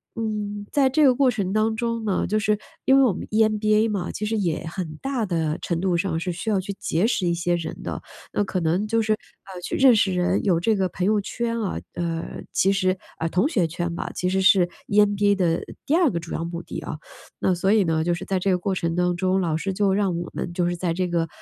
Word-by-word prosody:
嗯， 210 -2 -3
在 275 -2 +3
这 305 +3 +3
个 260 - +6
过 265 +1 +3
程 200 -6 -1
当 220 +1 +1
中 230 0 -2
呢， 200 -3 0
就 215 +3 +1
是 210 0 +1 0.3
因 265 - +6
为 275 - +6
我 245 - +4
们 - - -7
EMBA 215 0 +3
嘛， 200 -4 -2
其 210 - -4
实 220 +1 -1
也 170 -6 -1
很 160 -2 -5
大 270 -4 -1
地 160 -4 -1
程 170 -2 -2
度 185 -2 +1
上 170 -2 -1
是 180 +1 -2
需 175 +6 -4
要 200 - +2
去 200 +2 -5
结 170 +6 0
识 205 -6 +1
一 170 - +2
些 175 +1 0
人 165 -2 -5
的， - - -4 0.3
那 - - +1
可 190 -1 -2
能 175 +6 +1
就 230 +1 +2
是， 215 0 +2
呃， 190 -3 -10
去 - - -3
认 265 -3 +6
识 205 -3 +2
人， 180 0 +1
有 180 -5 +2
这 220 +6 +2
个 190 -2 +1
朋 180 - -3
友 210 +1 +3
圈 230 +3 -3
啊， 200 - -2 0.2
呃， 165 -1 -4
其 195 - +3
实 185 -1 +1 0.2
呃， 165 - -1
同 180 - +2
学 185 - +1
圈 175 +1 -3
吧， - - -4
其 180 - -1
实 190 +1 +1
是 190 -2 +5 0.2
EMBA 205 0 +3
的 170 -3 +1 0.2
第 285 - 0
2 340 -3 +4
个 170 - -2
主 165 0 -8
要 - - -2
目 170 0 -5
的 - - -6
啊， - - -6 0.4
那 190 - +2
所 185 +3 +1
以 215 -1 +4
呢， 160 -2 +1
就 175 +1 +1
是 - - -7
在 190 -1 0
这 195 - 0
个 180 - +3
过 190 +2 -2
程 170 -2 -1
当 180 0 +1
中， 185 +1 +1
老 165 -3 0
师 195 +4 -2
就 195 0 +2
让 195 -3 +1
我 170 0 -4
们 - - -4
就 175 0 0
是 175 - -1
在 175 -1 -1
这 185 0 0
个， 170 -1 0
190 Hz, 290 characters per minute, -24 LUFS, 175-215 Hz, 0.4 s, 个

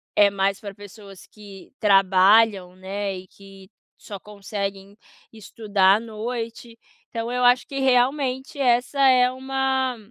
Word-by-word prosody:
é 205 -1 +5
mais 195 0 -2
pra 200 -2 -8
pessoas 200 -1 -14
que 205 -1 -15
trabalham, 195 -1 +3
né? 195 +1 -5
E 185 0 -12
que 195 0 -17 0.3
só 205 - -9
conseguem 200 0 -7 0.4
estudar 205 -2 +1
à - - -5
noite. 230 +1 -7 0.3
Então 230 0 -5
eu 250 0 -2
acho 245 0 +3
que 275 - -5
realmente 265 +1 0
essa 245 0 0
é 250 -1 +4
uma 265 -1 -2
215 Hz, 130 wpm, -22 LUFS, 195-250 Hz, 0.4 s, é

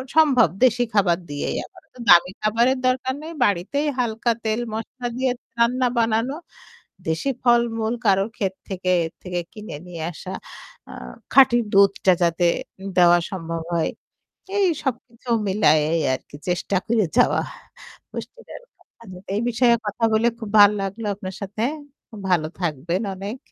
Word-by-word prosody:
সম্ভব, 275 - +5 0.2
দেশী 245 -1 +4
খাবার 185 -5 +3
দিয়েই। 145 0 -3
আমার 360 -2 -18
এতো 255 - -20
দামি 175 +1 +7
খাবারের 235 +5 +2
দরকার 260 +1 0
নেই, 330 - -7
বাড়িতেই 205 - 0
হালকা 235 0 0
তেল 220 +1 0
মশলা 245 +3 -5
দিয়ে 260 -1 +1 0.3
রান্না 250 +2 +2
বানানো। 230 +3 +1 0.7
দেশি 160 +12 -1
ফল-মূল 235 -2 +2
কারোর 195 +1 +3
ক্ষেত 190 -2 -1 0.2
থেকে, 185 -1 -3 0.2
এর 160 - -6
থেকে 180 -1 -3
কিনে 210 -6 -8
নিয়ে 170 -3 -7
আসা। 160 - -9 0.6
আ - - -9 0.4
খাঁটি 245 -3 +6
দুধটা 195 -1 +4
যাতে 170 +1 +1 0.5
দেওয়া 175 -1 +6
সম্ভব 165 -3 -4
হয়। 165 -2 0 0.7
এই 395 -2 +4 0.2
সবকিছু 245 -2 -5 0.2
মিলায়েই 160 -5 +3
আর 130 - -3
কি - - -11
চেষ্টা 180 +2 -1
করে 220 -3 +2
যাওয়া - - +4 0.7
পুষ্টীদায়ক - - -9
খাবারের। 185 -4 -15
এই 210 - 0
বিষয়ে 240 0 +4
কথা 210 +3 -4
বলে 220 +2 +3
খুব 220 -3 -6
ভাল 205 0 +9
লাগলো 200 +3 -4
আপনার 190 -2 -7
সাথে। 205 +2 -4 0.5
খুব 220 - -11
ভালো 165 -4 +2
থাকবেন 170 +3 -2
অনেক। 200 +6 -6
215 Hz, 145 wpm, -22 LUFS, 180-240 Hz, 0.7 s, ভাল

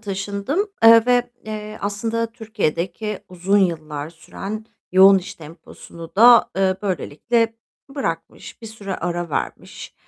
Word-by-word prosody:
taşındım, 205 - -3
eee, 230 0 +8
ve, 245 -1 +2
eee, 215 0 -7
aslında 225 +3 -2
Türkiye'deki 210 -2 -3
uzun 185 +3 +1
yıllar 155 -5 -2
süren 195 +6 -8 0.3
yoğun 190 +1 +7
iş 180 - -8
temposunu 165 +1 -12
da, 235 +2 +7
eee, 190 -1 +2
böylelikle 225 +5 -1 0.4
bırakmış, 165 - -5
bir - - -7
süre 210 -3 -6
ara 175 -1 -3
vermiş, - - -5
200 Hz, 120 wpm, -21 LUFS, 175-225 Hz, 0.4 s, eee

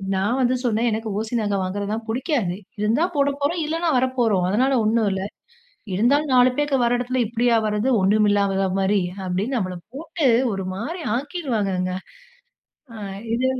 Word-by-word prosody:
நான் 210 +7 0
வந்து 255 +1 +2
சொன்னேன், 235 0 +2
"எனக்கு 220 0 -3
ஓசி 225 +2 -4
நகை 205 -1 0
வாங்குறதெல்லாம் 205 +4 -3
புடிக்காது. 235 - -1 0.2
இருந்தா 230 +10 +2
போடப்போறோம், 285 +4 0
இல்லன்னா 330 +2 -1
வரப்போறோம். 240 -7 +1
அதனால 260 +7 +2
ஒண்ணும் 220 -1 +2
இல்ல." 190 - -3 0.7
"இருந்தாலும் 280 +6 +2
4 250 0 +5
பேக்க 290 -2 +1
வர 240 +1 +2
இடத்தில 250 +1 0
இப்படியா 235 0 +2
வர்றது? 210 +4 0
ஒண்ணும் 210 +2 +3
இல்லாத 195 -1 +1
மாதிரி." 195 +1 +2 0.3
அப்படின்னு, 200 +9 -1
நம்மள 185 -4 -3 0.2
போட்டு 315 0 -2 0.3
ஒரு 195 -1 -4
மாரி 315 - -5
ஆக்கிடுவாங்கங்க. 220 - -2 1.0
ஆ. - - -9 0.4
இது, 255 +2 0
230 Hz, 145 wpm, -22 LUFS, 205-265 Hz, 1.0 s, 4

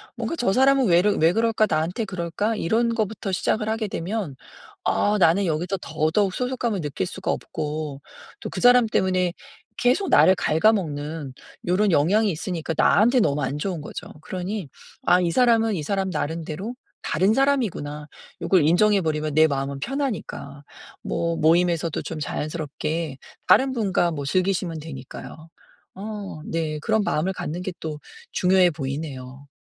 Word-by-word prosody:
뭔가 - - -3
'저 240 -11 +1
사람은 270 +1 +4
왜르 185 +3 +4
왜 165 +2 +4
그럴까? 225 0 +2
나한테 165 +8 -1
그럴까?' 190 +4 -2
이런 230 +5 +1
것부터 215 -3 -2
시작을 215 +4 0
하게 220 0 -1
되면 190 -5 -4 0.5
아 210 +1 +2
나는 185 +3 +4
여기서 175 +4 -1
더더욱 160 +5 0
소속감을 245 -6 -1
느낄 140 -10 -3
수가 - - -3
없고, 150 -2 -4 0.4
또 - - -5
그 - - -5
사람 245 -1 +6
때문에 185 -4 +1 0.4
계속 255 +12 +2
나를 190 - +6
갉아먹는 155 -6 0 0.3
요런 195 +3 +2
영향이 195 +8 +3
있으니까 165 0 -3
나한테 240 +10 +4
너무 145 -9 +1
안 135 +2 -2
좋은 175 -2 -3
거죠. - - -7
그러니 185 0 -5 0.4
'아 180 +1 +5
이 170 -1 +1
사람은 225 -1 +3
이 160 - -3
사람 195 +3 -1
나름대로 165 +7 -4 0.3
다른 190 +6 +2
사람이구나.' 220 - 0 0.3
요걸 185 -5 +3
인정해 200 +4 +4
버리면 155 -2 -1
내 160 0 +6
마음은 140 -1 -3
편하니까. 215 - -4 0.4
뭐 170 0 -1
모임에서도 170 0 +2
좀 160 - -5
자연스럽게 155 0 -3 0.3
다른 265 0 +5
분과 190 -7 +1
뭐 145 -3 -4
즐기시면 180 0 0
되니까요. 155 +2 -9 0.5
어 205 -3 -6
네 155 -2 -2
그런 220 +4 +1
마음을 185 +1 0
갖는 175 -1 -4
게 185 - -4
또 155 -2 -5 0.3
중요해 185 0 +4
보이네요. 135 -2 -6
180 Hz, 330 characters per minute, -24 LUFS, 155-210 Hz, 0.5 s, 사람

